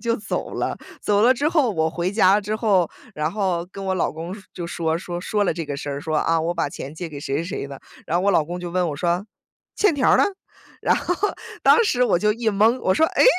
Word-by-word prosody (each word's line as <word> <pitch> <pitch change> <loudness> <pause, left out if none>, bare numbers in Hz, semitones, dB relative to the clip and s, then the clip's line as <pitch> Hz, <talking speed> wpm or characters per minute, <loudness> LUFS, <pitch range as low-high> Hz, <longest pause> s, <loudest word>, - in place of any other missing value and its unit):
就 230 -1 0
走 210 - -4
了。 - - -2 0.2
走 205 -1 +2
了 250 +3 +6
之 285 +4 +1
后， 295 -9 +2
我 160 -3 +1
回 175 +3 -2
家 200 -1 +5
之 210 +1 -3
后， 195 -7 +2 0.3
然 155 +2 -1
后 185 -4 -1
跟 195 - -7
我 190 -1 0
老 175 - 0
公 165 +3 -6
说 210 - -11
就 175 - -5
说 165 -1 -1
说 175 0 -5
说 205 +3 0
了 - - +1
这 165 0 -4
个 145 -1 -4
事 145 0 -5
儿， 140 0 -4
说 155 +1 -2
啊 165 +1 +2
我 170 +2 -1
把 165 -4 0
钱 140 +1 -8
借 170 +1 -5
给 150 -3 -8
谁 140 -1 -2
谁 165 - -2
谁 170 - -4
的。 140 -1 -9 0.3
然 170 - 0
后 180 - +1
我 200 - +4
老 165 -5 +3
公 175 +3 -6
就 175 -1 -5
问 180 0 +1
我 - - -4
说： 175 +5 0 0.5
“欠 410 -5 +4
条 275 - +3
儿 - - +6
呢？” - - +5 0.6
然 - - +3
后， 355 - -1 0.5
当 470 - +7
时 250 - +2
我 245 - +3
就 210 +3 +2
一 230 +1 -1
蒙， 220 +5 +3
我 185 - +2
说： 320 - +4
“诶， - - +6
180 Hz, 280 characters per minute, -22 LUFS, 165-210 Hz, 0.6 s, 当